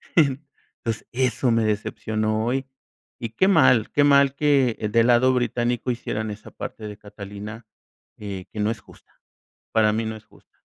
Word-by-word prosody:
entonces, 140 -6 -1
eso 125 0 +1
me 115 -1 +2
decepcionó 110 +1 -1
hoy, 130 +3 -1 0.5
y 115 -3 -5
qué 185 +12 +2
mal, 130 - +4
qué 145 - +3
mal 140 -1 +5
que 140 -5 +2
el 105 - -2
del 115 0 +4
lado 125 +2 +5
británico 120 0 0
hicieran 110 -2 -3
esa 105 +1 -10
parte 110 - -7
de 105 -1 -8
Catalina 105 +2 -9 0.5
que 100 -3 -7
que 105 - -7
no 105 +2 +1
es 115 - -5
justa, - - -21 0.5
para 110 -1 +4
mí 110 +1 -1
no 110 0 -4
es 110 0 -13
justa. - - -24
115 Hz, 170 wpm, -24 LUFS, 110-130 Hz, 0.5 s, mal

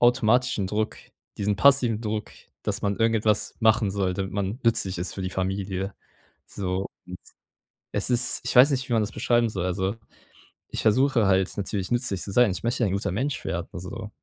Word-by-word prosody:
automatischen 120 -3 +3
Druck, 105 +2 -2 0.4
diesen 105 0 +1
passiven 130 -5 +4
Druck, 110 -1 -4 0.3
dass - - -2
man 100 -1 0
irgendetwas 110 -2 +1
machen 110 -2 +3
soll, 95 -2 0
damit 95 0 -4
man 100 +3 -2
nützlich 105 -6 +1
ist 85 -1 -4
für 95 - -5
die 95 - -3
Familie. 95 +1 -3 0.5
So, 95 -1 -3
und - - -3 1.1
es - - 0
ist 125 0 +4
ich - - -2
weiß 135 +4 +8
nicht, 130 -1 -2
wie - - 0
man 110 -2 +3
das 105 - -4
beschreiben 120 -1 +2
soll. 95 -4 -3
Also, 95 +3 -1 0.7
ich - - -4
versuche 125 +1 +3
halt 95 -1 +2
natürlich 100 +1 -3
nützlich 120 -7 0
zu 100 - -4
sein. 120 +1 +4
Ich 90 +1 -5
möchte 120 +1 -1
ja - - +3
ein 95 - -2
guter 100 -1 -1
Mensch 135 +8 -2
werden, 85 +1 -3
also, 100 +4 -7
105 Hz, 190 wpm, -25 LUFS, 95-120 Hz, 1.1 s, weiß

